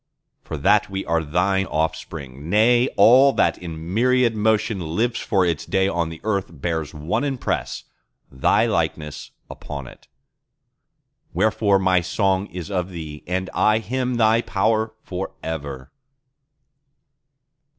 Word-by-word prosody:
For 80 - -6
that 105 +9 +3
we 95 0 -4
are 80 0 0
Thine 95 +5 +1
offspring; 75 -2 -4
nay, 120 +5 +4
all 130 +7 +7
that - - +1
in 85 0 -7
myriad 125 +1 +3
motion 110 -1 +1 0.2
Lives 115 +3 0
for 95 -4 +1
its 85 -4 -1
day 95 -1 +1
on 85 -3 -1
the 80 -1 -9
earth 100 -3 -1
bears 80 0 -3
one 75 - -2
impress—Thy 130 - -2
likeness—upon 75 -2 -4
it. - - -15 1.3
Wherefore 110 -2 +3
my 95 -1 +2
song 95 +2 0
is 90 +2 -7
of 90 -1 -1
Thee, 80 -4 -8
and 95 +1 -2
I 110 0 +3
hymn 125 +3 -2
thy 115 0 +3
power 110 +2 0
for 95 +1 -5
ever. 70 -5 -6
95 Hz, 125 wpm, -22 LUFS, 80-110 Hz, 1.3 s, all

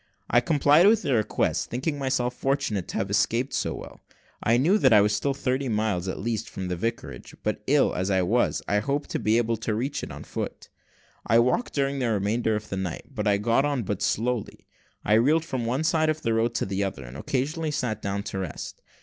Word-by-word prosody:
I 120 - +5
complied 150 +5 +5
with 220 +1 +4
their 130 -4 +2
request, 110 - 0
thinking 145 +5 -2
myself 130 -2 0
fortunate 135 -8 -1
to - - -4
have 100 - -2
escaped 115 +5 +1
so - - -1
well. - - -10 0.4
I 115 +2 +3
knew 175 - +3
that 130 - +4
I 105 - +8
was 105 +1 +3
still 140 +5 -1
thirty 130 -1 -1
miles 105 -4 0
at 95 - -3
least 110 0 -3
from 95 -1 -5
the 90 - -1
vicarage; 115 +8 -5
but - - -1
ill - - +3
as 95 +2 -1
I 95 -2 +2
was, 115 +7 +1
I 105 - +2
hoped 140 +6 -2
to - - -1
be 110 +1 +2
able 115 -1 +1
to 110 0 -2
reach 130 +6 -2
it - - -6
on - - -8
foot. - - -6 0.6
I 115 - +5
walked 125 - +1
during 140 -1 0
the 125 -3 0
remainder 110 +2 0
of 105 0 -5
the 95 - -3
night, 95 +8 -5
but 105 -4 -2
I 100 -1 +4
got 115 +5 +2
on 145 -4 0
but 100 -1 -3
slowly. 120 0 -1 0.4
I 105 - +3
reeled 150 +9 +4
from 125 -6 -3
one 130 +6 0
side 160 -1 +2
of 155 0 -2
the 115 - +1
road 115 +1 +1
to - - 0
the 95 +1 -1
other, 95 -9 -4
and - - -10
occasionally 150 - -2
sat 120 -7 -2
down 100 0 -2
to 95 - -4
rest. 90 -6 -6
115 Hz, 225 wpm, -26 LUFS, 105-135 Hz, 0.6 s, I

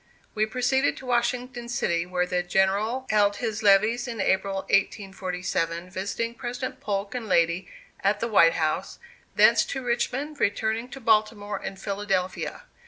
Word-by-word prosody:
We 215 0 +1
proceeded 255 +4 +1
to 265 - -10
Washington 245 0 -1
city, 170 -7 0
where 180 0 0
the 180 0 0
General 195 +8 +1
held 205 -1 +3
his 220 -1 -3
levees 215 +4 +4
in 230 -2 -5
April, 195 0 +1
1847, 185 -3 -1
visiting 200 +5 -3
President 245 +1 -5
Polk 200 0 -2
and 245 -3 -4
lady 170 0 +2 0.3
at 205 +1 +1
the 230 - -1
White 170 -7 +5
House 155 -2 -1 0.4
thence - - +6
to 265 -1 -4
Richmond, 260 +5 -2
returning 220 +3 0
to 270 - -9
Baltimore 215 -3 +1
and 190 - -6
Philadelphia. 195 -2 -2
210 Hz, 145 wpm, -26 LUFS, 190-240 Hz, 0.4 s, thence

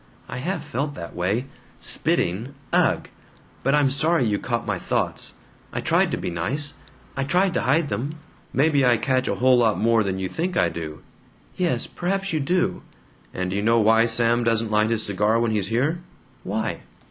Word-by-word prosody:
"I - - -6
have 170 +5 -3
felt 145 0 -3
that 85 -1 -8
way. 100 +8 0 0.3
Spitting 110 +11 -1 0.2
ugh! - - +2 0.5
But 135 - +2
I'm 145 -2 +3
sorry 155 +3 +2
you 105 -2 0
caught 120 -1 -2
my - - -2
thoughts. - - -2 0.4
I - - -3
tried - - +2
to - - -2
be - - -3
nice; 140 - -2 0.4
I 140 - -1
tried 180 +6 +2
to - - 0
hide 140 +5 +2
them." 140 +6 -3 0.4
"Maybe 140 0 +3
I 120 -2 +5
catch 130 +2 0
a - - 0
whole 130 0 +4
lot 115 -3 +3
more 115 0 +3
than 95 -1 -2
you 95 0 -2
think 175 - -2
I - - +3
do!" 80 -2 -7 0.5
"Yes, 170 -10 0
perhaps 195 +1 -2
you 155 - +1
do." 180 +6 0 0.5
"And 90 0 -3
d' - - -2
you 100 - 0
know 115 +2 +3
why 110 +1 +5
Sam 120 +1 +2
doesn't 115 -1 +1
light 105 +1 +3
his 115 -1 +1
cigar 105 +3 +1
when 115 -1 +1
he's 105 -3 0
here?" 140 - 0 0.4
"Why?" 110 +3 -2
120 Hz, 190 wpm, -23 LUFS, 110-145 Hz, 0.5 s, I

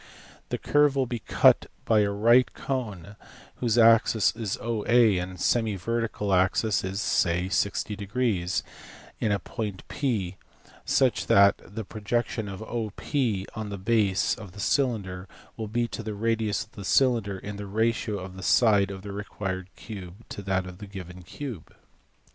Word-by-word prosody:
This - - -3
curve 145 -1 +4
will 135 -1 +2
be 120 -1 -4
cut - - +4 0.2
by 110 -2 +4
a 105 -1 +3
right 115 +5 +4
cone 105 -8 -4 0.4
whose 120 -2 0
axis 115 -2 +5
is 110 -4 -3
OA 115 -2 +3
and 90 0 -6
semi 110 +1 +1
vertical 110 -1 -1
angle 95 +4 +2
is 95 -1 -1
(say) 90 -3 +1
60 100 +1 -1 1.2
in 110 - +1
a 100 - +2
point 100 0 -5 1.0
^such 130 -3 +2
that 100 0 +6
the 110 +4 -7
projection 110 +1 -2
of 95 +2 -7
OP 110 -3 -5 0.5
on 110 -1 -5
the 100 - -5
base 100 -1 +2
of 105 -6 -9
the 100 - -11
cylinder 100 -7 0 0.3
will 110 -1 -5
be 120 +3 0
to - - -5
the 110 -1 -5
radius 110 -1 0
of 110 - -21
the 100 - -9
cylinder 115 -3 +2
in 100 +2 -7
the 100 0 -6
ratio 110 +1 0
of 95 0 -8
the 95 - -8
side 100 -1 +4
of 95 -1 -7
the 100 - -6
required 95 -2 -5
cube 100 0 -9
to - - -6
that 95 -1 -1
of 90 -1 -10
the 105 - -8
given 90 -2 -9
cube. 110 - -8
105 Hz, 160 wpm, -27 LUFS, 95-115 Hz, 1.2 s, that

